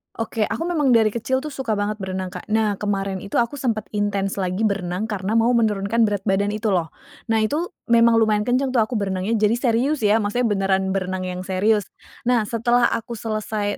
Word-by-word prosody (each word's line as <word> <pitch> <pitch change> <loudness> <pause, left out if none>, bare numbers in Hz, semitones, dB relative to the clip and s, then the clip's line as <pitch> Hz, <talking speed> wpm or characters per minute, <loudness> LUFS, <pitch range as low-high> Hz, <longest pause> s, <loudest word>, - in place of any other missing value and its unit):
Oke, 225 -1 -1
aku - - -3
memang 300 -8 +2
dari 220 -2 +4
kecil 260 +4 -1
tuh 305 - -5
suka 260 -5 -2
banget 210 +1 -2
berenang, 185 -1 -4
Kak. 180 - -8
Nah, 215 -1 +2
kemarin 195 -2 -2
itu 200 - -7
aku 235 +3 +1
sempet 230 -4 -1
intens 200 -1 -1
lagi 185 +3 -1
berenang, 190 -2 -1
karena 210 0 -2
mau 230 +2 +3
menurunkan 220 0 +2
berat 205 -2 -2
badan 200 0 +1
itu 215 0 -1
loh. 170 -3 0 0.4
Nah 220 -1 +2
itu 305 +10 -1 0.2
memang 235 0 +6
lumayan 215 -2 +3
kenceng 255 +2 +1
tuh 250 - +3
aku 230 +3 -1
berenangnya, 195 +2 -1
jadi 210 +1 +3
serius 255 +4 +1
ya, 210 0 +4
maksudnya 225 +3 0
beneran 195 -2 +1
berenang 185 -1 -2
yang 180 0 -4
serius. 205 +2 +1 0.4
Nah, 240 -3 +2
setelah 240 +2 +2
aku 230 +1 -3
selesai 215 -2 -3
215 Hz, 195 wpm, -22 LUFS, 195-235 Hz, 0.4 s, memang